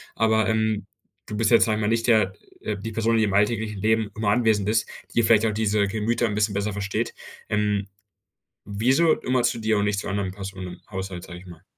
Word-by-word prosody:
aber, 110 -1 +2
ähm, 110 -2 0 0.4
du 105 - -5
bist 110 +1 +2
jetzt, 115 - +6
sage 110 -2 0
ich - - -3
mal, 105 - 0
nicht 115 +1 0
der 110 -5 +3 0.3
äh, 105 -1 -3
die 110 +3 -6
Person, 115 +1 +1
die 110 - +3
im 100 - -2
alltäglichen 105 +1 +1
Leben 110 0 +1
immer 110 -1 -1
anwesend 110 -3 +2
ist, 110 0 +1 0.2
die 115 - +3
vielleicht 110 0 +4
auch 110 - +2
diese 105 -1 +1
Gemüter 110 +3 0
'n 110 - -1
bisschen 105 0 +1
besser 100 +1 -1
versteht. 100 0 -2 0.4
Ähm, 105 -1 0 0.8
wieso 130 +11 +2
immer 125 -1 +1
zu 120 -1 +1
dir 110 -1 +1
und 100 - +1
nicht 105 -1 0
zu - - -4
anderen 100 -1 -2
Personen 95 -1 -7
im 90 0 -10
Haushalt, 95 -2 -5
sage 90 -1 -9
ich 95 - -16
mal? 85 -2 -13
105 Hz, 225 wpm, -24 LUFS, 100-110 Hz, 0.8 s, jetzt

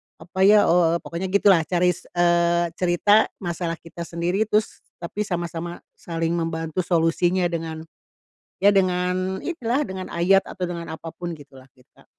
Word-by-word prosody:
apa 190 +4 0
ya, 210 0 +7
oh,” 170 -1 +4
eee, 170 - -4
pokoknya 170 +3 -4
gitu 200 +2 +4
lah. 180 - +5
Cari, 180 0 +2
s - - -10
eee, 170 0 +2
cerita 185 +4 +4 0.2
masalah 170 -1 -3
kita 165 +1 -9
sendiri 175 +5 -1
terus 215 0 0 0.2
tapi 175 +4 -5
sama-sama 170 -1 -4
saling 165 -1 -3
membantu 165 0 -3
solusinya 175 +1 +1
dengan 160 -1 -4 0.8
ya 200 - +8
dengan 185 0 0
inilah, 275 -5 -1
dengan 185 -1 -6
ayat 190 +3 +4
atau 185 - -6
dengan 170 -1 -5
apa 160 +1 -7
pun 175 -1 -6
gitu 140 -3 -15
lah 130 - -18
kita. 125 -1 -24
175 Hz, 165 wpm, -23 LUFS, 165-185 Hz, 0.8 s, ya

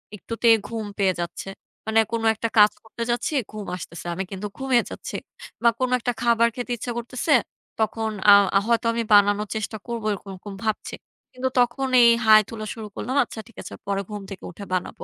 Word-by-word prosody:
একটুতেই 230 +2 +3
ঘুম 225 -1 -4
পেয়ে 195 -2 +2
যাচ্ছে। 170 +2 -5 0.4
মানে 220 0 +3
কোন 230 -1 -1
একটা 230 +2 -2
কাজ 210 0 +8
করতে 225 +1 -6
যাচ্ছি 240 +5 -1 0.2
ঘুম 215 -1 -7
আসতেছে, 170 -1 -9
আমি 190 +3 -3
কিন্তু 195 +1 -4
ঘুমিয়ে 265 -3 +2
যাচ্ছি। - - -7 0.5
বা 235 - +7
কোন 255 -1 +1
একটা 245 +1 -1
খাবার 235 -1 +4
খেতে 245 0 -5
ইচ্ছা 240 +2 -4
করতেছে 250 +5 -1 0.5
তখন 220 +1 0 0.2
আ - - +11 0.2
আ - - +5
হয়তো 235 0 +2
আমি 230 0 -1
বানানোর 205 +1 +5
চেষ্টা 220 0 -3
করবো 235 -2 -4
এরকম, 200 0 -8
এরকম 195 +2 -9
ভাবছি। 215 -1 -2 0.4
কিন্তু 260 +1 -2
তখন 245 +2 +1
এই 235 - +8 0.2
হাই 215 0 +8
তোলা 215 -2 -6
শুরু 220 -2 -8
করলাম, 255 +3 -3
আচ্ছা 235 - -9
ঠিক 235 - -20
আছে - - -9
পরে 200 0 0
ঘুম 210 -1 -5
থেকে 190 - -8
উঠে 200 +4 -9
বানাবো। 185 - -3
220 Hz, 195 wpm, -24 LUFS, 205-235 Hz, 0.5 s, আ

